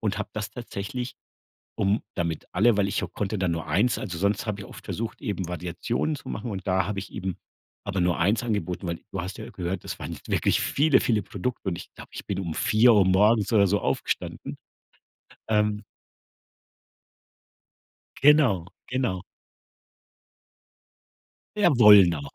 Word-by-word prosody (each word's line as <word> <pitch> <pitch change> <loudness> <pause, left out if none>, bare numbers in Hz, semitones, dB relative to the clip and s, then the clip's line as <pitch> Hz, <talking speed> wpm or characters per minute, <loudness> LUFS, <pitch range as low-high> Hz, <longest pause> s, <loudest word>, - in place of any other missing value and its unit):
und 105 -2 -1
habe 110 - -3
das 105 -2 -4
tatsächlich, 120 +1 -5 0.6
um 100 +3 +1
damit 85 -3 -3
alle 105 +3 +3
weil 100 -1 +2
ich - - -1
auch - - -9
konnte 105 +1 -2
dann 95 -2 0
nur 85 -1 -3
1 105 +10 +2
also, 90 -5 -5
sonst 100 +5 0
habe 100 -1 -3
ich - - -9 0.2
versucht, 115 +1 -5
eben 95 -4 -3
Variationen 90 - -2
zu - - -9
machen 110 +2 -4
und 95 -2 -6
da 95 -1 +2
habe 105 -1 -3
ich 100 - -6
eben 95 -2 -4 0.5
aber 100 -2 -2
nur 90 0 +1
1 100 +7 +2
angeboten, 100 -5 -2
weil 85 -1 -3
du 95 - -2
hast 95 +3 -6
ja - - -6
hö - - -10
gehört, 90 0 -4
das - - -6
waren - - -6
wirklich - - +2
viele, 145 -1 +3
viele 110 -3 +1
Produkte 100 +4 -4
und 85 - -1
ich 85 - -10
glaube, - - -12
ich - - -7
bin 95 - -2
um 85 -4 -4
4:00 110 0 +5
morgens 105 +3 +3
oder 100 -2 +5
so 100 +2 +1
aufgestanden. - - -3 0.9
Ähm 105 -1 +1 2.4
Genau, 135 - +5 0.2
genau. 125 -8 -1 2.4
Jawohl, 115 - +8
na. 80 -4 -3
100 Hz, 160 wpm, -26 LUFS, 95-110 Hz, 2.4 s, Jawohl